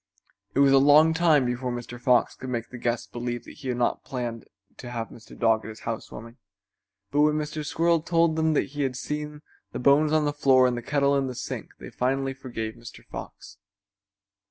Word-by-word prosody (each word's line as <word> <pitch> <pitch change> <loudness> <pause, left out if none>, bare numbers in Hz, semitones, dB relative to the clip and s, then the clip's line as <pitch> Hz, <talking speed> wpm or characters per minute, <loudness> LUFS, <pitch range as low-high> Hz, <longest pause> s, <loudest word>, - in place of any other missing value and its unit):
It - - +2
was 140 -1 +6
a 135 - +7
long 150 +3 +6
time 160 -5 +4
before 125 +1 -2
Mr. 120 0 -7
Fox 125 -1 +3
could 130 - -8
make 120 -2 -3
the 125 - -8
guests 120 0 -1
believe 120 0 -5
he 135 - -10
had 125 -1 -1
not 120 - 0
planned 120 -3 -5 0.3
to 125 - -8
have 115 -2 -4
Mr. 115 - -14
Dog 110 -2 +2
at 110 - -7
his 110 - -10
house 115 -1 -5
warming, 115 +2 -10 0.7
but 145 +2 +2
when 150 0 +4
Mr. 155 0 -3
Squirrel 165 +2 +1
told 165 -1 +2
them 160 -1 +1
that - - +1
he 145 +1 -5
had 130 -2 -1
seen 150 +3 -5 0.3
the - - -3
bones 145 +4 +4
on 155 -1 +3
the 145 - 0
floor 135 -3 +4
and 125 -1 +1
the 120 - -4
kettle 140 +2 +1
in 135 -1 +1
the 130 - -5
sink 125 - -6
they - - -10
finally 135 +1 -1
forgave 120 -5 -5
Mr. 115 -1 -12
Fox. - - -10
130 Hz, 210 wpm, -26 LUFS, 120-150 Hz, 0.7 s, a